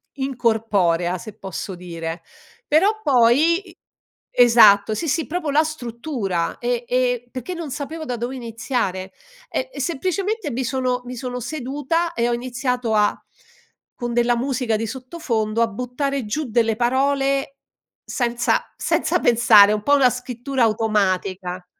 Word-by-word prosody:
incorporea, 220 -10 0
se 215 +2 -10
posso 190 0 -6
dire. 165 -2 -6 0.5
Però 395 +9 +3
poi, 285 - +3
i 335 - -16 0.6
Esatto, 220 -4 +6
sì, 325 +7 -2
sì, 315 +3 0
proprio 320 -2 -2
la 300 +2 +4
struttura, 235 - -3
e 240 0 -1
e 245 -1 0
perché 255 +8 -6
non 335 -3 -6
sapevo 300 +4 -5
da 250 - -3
dove 240 +2 -4
iniziare, 225 -5 -3 0.4
e - - -3
e - - -5
semplicemente 375 +3 -2
mi 255 +2 -2
sono 255 0 -1
mi 250 +1 -7
sono 250 0 -5
seduta 295 +5 -2
e 235 0 0
ho - - +1
iniziato 245 -1 -2
a 210 -1 +3 0.8
con 240 -1 -4
della 240 0 +2
musica 250 -3 -1
di 225 +1 -3
sottofondo, 235 -4 -2
a 230 - +4
buttare 250 +4 -3
giù 300 +9 -2
delle 225 -1 +1
parole, 275 +2 +1 0.5
senza 240 -1 -1
senza - - +1
pensare 225 -4 +6
un 210 - -2
po' 285 +5 +4
una 265 -3 +5
scrittura 250 +1 -2
automatica. 190 -4 0
245 Hz, 140 wpm, -21 LUFS, 220-275 Hz, 0.8 s, Esatto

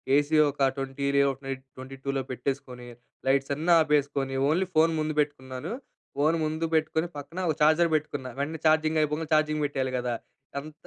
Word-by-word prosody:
AC 145 +2 +2
ఒక 140 -1 +1
20 135 +1 -3
రే 140 - +5
ఒక 135 - -9
night 135 -1 -4
22లో 135 +1 -4
పెట్టేసుకొని. 125 -1 -4 0.4
లైట్స్ 135 +1 +2
అన్నీ 165 +4 +2
ఆపేసుకొని, 145 -3 +1
ఓన్లీ 180 +4 +1
ఫోన్ 160 +1 +5
ముందు 155 0 -1
పెట్టుకున్నాను. 130 -3 -5 0.5
ఫోన్ 155 +3 +3
ముందు 155 +1 -1
పెట్టుకొని, 160 +1 +1
పక్కన 165 +5 -7
ఒక 155 - +1
ఛార్జర్ 160 +3 +5
పెట్టుకున్న, 145 -3 -2
వెంటనే 155 +3 -2
ఛార్జింగ్ 155 0 +3
అయిపోగానే 150 +1 -2
ఛార్జింగ్ 155 0 +2
పెట్టేయాలి 130 -2 -2
గదా! 125 -1 -2 0.4
అంత 155 +2 -10
145 Hz, 160 wpm, -27 LUFS, 135-155 Hz, 0.5 s, రే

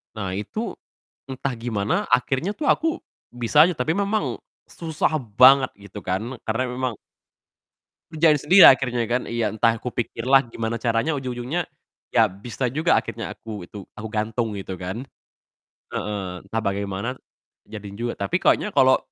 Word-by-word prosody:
Nah 95 -3 -3
itu, 215 - -4 0.5
entah 130 0 -3
gimana 110 -3 -1
akhirnya 135 - +1
tuh 300 +7 -4
aku 325 - +3 0.4
bisa 120 +5 +4
aja, 180 - +3
tapi 155 +7 0
memang 200 +2 -1 0.3
susah 160 -1 -2 0.2
banget 130 +1 +7
gitu 100 +1 -10
kan, 110 +8 -3
karena 115 +3 -1
memang 125 -1 -2 1.2
Kerjain 155 -1 +4
sendiri 180 +7 +8
akhirnya 125 -3 +4
kan. 125 +1 0
Iya, 115 -1 -1
entah 115 0 +2
kupikir 120 -1 -4
lah 135 0 +6
gimana 115 -1 -4
caranya, 115 +6 0
ujung-ujungnya 130 +5 -3 0.5
ya 110 -1 +5
bisa 115 +6 -4
juga 155 +7 +2
akhirnya - - -6
aku 105 -5 -8
itu 100 +1 -10
aku 110 +1 -6
gantung, 110 +1 -1
gitu 95 -1 -6
kan. 95 +9 -6 0.9
Heeh, 95 -4 -4
entah 110 +3 -3
bagaimana, 100 +4 -2 0.6
jadi 105 -2 -8
juga. 120 +3 -4
Tapi 100 0 -1
kayaknya - - +2
kalo 130 0 +5
120 Hz, 145 wpm, -23 LUFS, 105-135 Hz, 1.2 s, sendiri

